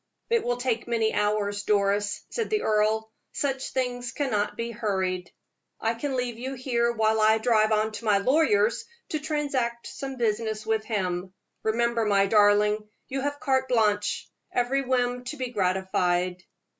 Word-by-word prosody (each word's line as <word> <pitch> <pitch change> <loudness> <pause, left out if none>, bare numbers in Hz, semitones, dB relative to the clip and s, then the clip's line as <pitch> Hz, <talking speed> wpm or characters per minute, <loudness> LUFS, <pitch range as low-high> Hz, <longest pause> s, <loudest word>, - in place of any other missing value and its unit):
"It 465 -1 +3
will 245 0 0
take 245 -2 -1
many 225 -2 +1
hours, 205 -1 0
Doris," 205 0 +1
said 455 -2 -2
the 430 -1 0
earl; 220 +1 +1 0.2
"such 270 -2 -2
things 245 -1 -2
cannot 220 -8 -1
be 230 0 -3
hurried. 190 -5 -2 0.5
I 225 - 0
can 265 +4 -3
leave 245 -2 -2
you 260 +2 -4
here 240 -2 +1
while 220 -1 +2
I 220 +1 +5
drive 220 -1 +3
on 215 0 +2
to 215 +2 -8
my 210 -2 +4
lawyer's, 225 -2 +3 0.3
to 310 - -1
transact 280 -6 -2
some 270 -1 -6
business 220 -2 -1
with 220 -1 0
him. 185 -3 -2 0.3
Remember, 235 +1 +1
my 200 -1 +4
darling, 210 0 +4 0.3
you 270 +1 -2
have 285 +1 -2
carte 265 -2 +1
blanche 210 -4 +1 0.2
every 250 +3 +1
whim 250 -1 0
to 300 +4 -5
be 255 -2 -3
gratified." 185 -3 0
225 Hz, 155 wpm, -26 LUFS, 210-250 Hz, 0.5 s, I